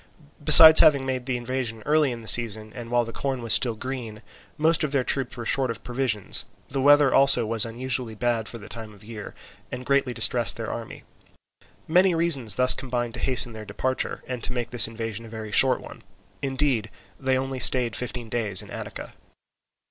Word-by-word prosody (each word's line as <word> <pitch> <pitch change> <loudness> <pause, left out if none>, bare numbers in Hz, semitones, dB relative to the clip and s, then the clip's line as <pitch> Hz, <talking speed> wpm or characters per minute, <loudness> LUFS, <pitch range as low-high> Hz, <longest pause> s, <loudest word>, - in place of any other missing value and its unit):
Besides 160 +1 +11
having 140 -3 +3
made 130 -1 -5
their 130 - -2
invasion 120 -2 -5
early 150 -2 +1
in 115 -1 -9
the - - -12
season, 110 -2 +1
and 120 -2 -10
while 120 0 0
the 115 - -10
corn 135 -3 -5
was 115 - +2
still 120 -3 +1
green, 120 -3 -8 0.3
most 160 +1 +1
of 150 - -3
their 135 -3 -1
troops 130 -2 -4
were 120 - -8
short 130 +2 -1
of 115 - -7
provisions: 120 -5 -1 0.3
the 135 - -3
weather 145 -1 +3
also 135 -4 +4
was 115 0 +1
unusually 120 -1 -5
bad 115 0 -3
for 115 - -8
the 105 - -13
time 110 -2 -9
of 100 - -18
year, 105 -1 -11 0.4
and 125 0 -8
greatly 140 -1 0
distressed 120 - +1
their - - -6
army. - - -10 0.8
Many 180 +2 +2
reasons 140 - +2
thus 125 0 +4
combined 120 -3 -5
to 115 - -8
hasten 125 -2 0
their 110 -1 -10
departure 130 +6 -5
and 125 -2 -7
to - - -3
make 120 -1 -5
this 120 -2 +4
invasion 115 -1 -7
a 115 - -13
very 110 -1 -9
short 130 +4 +2
one; - - -13 0.4
indeed 135 -5 -2 0.3
they 130 -1 -1
only 135 0 -5
stayed 125 -2 +3
fifteen 125 -1 -5
days 110 -4 -1
in - - -15
Attica. - - -9
125 Hz, 195 wpm, -23 LUFS, 115-135 Hz, 0.8 s, Besides